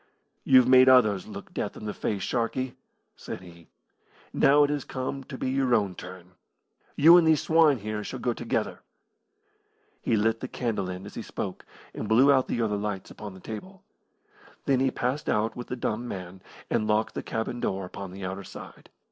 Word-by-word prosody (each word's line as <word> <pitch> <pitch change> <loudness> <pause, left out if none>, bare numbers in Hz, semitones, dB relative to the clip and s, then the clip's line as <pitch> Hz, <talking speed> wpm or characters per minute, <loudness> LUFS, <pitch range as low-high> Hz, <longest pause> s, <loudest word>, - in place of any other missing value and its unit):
"You've 130 -2 +6
made 130 0 +7
others 110 -7 +4
look - - -9
death - - -3
in - - -8
the 105 - -3
face, 100 -3 -3
Sharkey," 125 +1 -2 0.4
said - - -7
he; 85 -2 -15 0.7
"now 145 +2 +5
it 145 - +1
has 145 -2 -2
come 130 +1 -4
to 130 - -8
be 130 - -2
your 130 -2 +2
own 100 -4 +1
turn. 90 0 -11 0.6
You 165 +4 +8
and 170 -2 +4
these 160 -2 +4
swine 160 -4 +4
here 105 0 -4
shall - - -6
go 120 - -1
together!" - - -2 1.2
He 115 - +1
lit 110 +1 +1
the 130 - -5
candle 110 -8 -2
end 90 +1 -6
as 100 - -10
he - - -5
spoke, 95 -3 -6 0.3
and 110 - -5
blew 130 +6 +6
out 130 -2 +3
the 120 - -1
other 105 -2 0
lights 100 -2 -4
upon 105 -3 -9
the - - -12
table. 185 - -9 0.8
Then 135 -2 +3
he 135 0 +3
passed 130 +4 -2
out 110 +1 +1
with 120 - -7
the - - -3
dumb 120 0 -3
man, 95 -2 -7 0.3
and 110 - 0
locked 110 +1 +1
the - - -4
cabin 115 +2 -3
door 95 -4 -2
upon 95 +1 -8
the 95 0 -7
outer 95 +2 -5
side. - - -11
115 Hz, 195 wpm, -27 LUFS, 100-130 Hz, 1.2 s, You